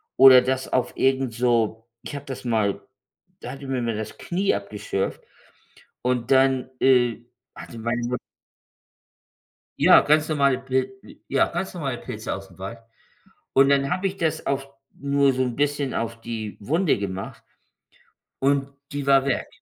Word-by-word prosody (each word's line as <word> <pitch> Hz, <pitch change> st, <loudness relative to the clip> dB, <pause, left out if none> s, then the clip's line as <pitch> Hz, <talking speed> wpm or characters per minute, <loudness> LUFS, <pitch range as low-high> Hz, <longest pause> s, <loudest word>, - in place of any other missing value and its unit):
oder 130 Hz, -1 st, +9 dB
das 130 Hz, +1 st, -2 dB
auf 130 Hz, -1 st, 0 dB
irgend 135 Hz, -3 st, +1 dB
so 115 Hz, -2 st, +1 dB
ich -, -, -7 dB
habe 140 Hz, 0 st, -7 dB
das 130 Hz, -2 st, -7 dB
mal 110 Hz, -4 st, 0 dB, 0.6 s
da -, -, -7 dB
hatte 140 Hz, +1 st, -9 dB
ich 135 Hz, -, -8 dB
mir 130 Hz, -2 st, -1 dB
mal 115 Hz, -2 st, -1 dB
das 110 Hz, -, -6 dB
Knie 190 Hz, -, 0 dB
abgeschürft 100 Hz, -1 st, -3 dB, 0.8 s
und 125 Hz, -1 st, -1 dB
dann, 130 Hz, -1 st, +3 dB
äh, 120 Hz, -3 st, +3 dB, 0.3 s
hatte 115 Hz, -, -10 dB
meine 120 Hz, +1 st, -1 dB
Mutt 125 Hz, -2 st, -1 dB, 1.6 s
Ja, -, -, +8 dB
ganz 155 Hz, +1 st, +3 dB
normale 140 Hz, -3 st, +2 dB
Pil 135 Hz, +8 st, -2 dB
äh, -, -, -16 dB
ja, -, -, +3 dB
ganz 190 Hz, -, -4 dB
normale 135 Hz, -7 st, -3 dB
Pilze 110 Hz, -3 st, -6 dB
ausm 95 Hz, 0 st, -10 dB
Wald. 100 Hz, +5 st, -6 dB, 0.8 s
Und 135 Hz, +1 st, +5 dB
dann 140 Hz, 0 st, +3 dB
habe 185 Hz, +2 st, -1 dB
ich 195 Hz, +1 st, -6 dB
das 160 Hz, -1 st, -1 dB
auf 140 Hz, 0 st, -1 dB, 0.3 s
nur 140 Hz, -1 st, +2 dB
so 130 Hz, -, -1 dB
'n 125 Hz, -2 st, -3 dB
bisschen 145 Hz, -1 st, 0 dB
auf 115 Hz, 0 st, -3 dB
die 110 Hz, -3 st, -5 dB
Wunde 160 Hz, -, +1 dB
gemacht. 95 Hz, -1 st, -5 dB, 1.0 s
Und 140 Hz, 0 st, +1 dB, 0.2 s
die 145 Hz, -1 st, -4 dB
war 135 Hz, 0 st, +5 dB
weg. 135 Hz, -, -1 dB
130 Hz, 160 wpm, -24 LUFS, 115-140 Hz, 1.6 s, oder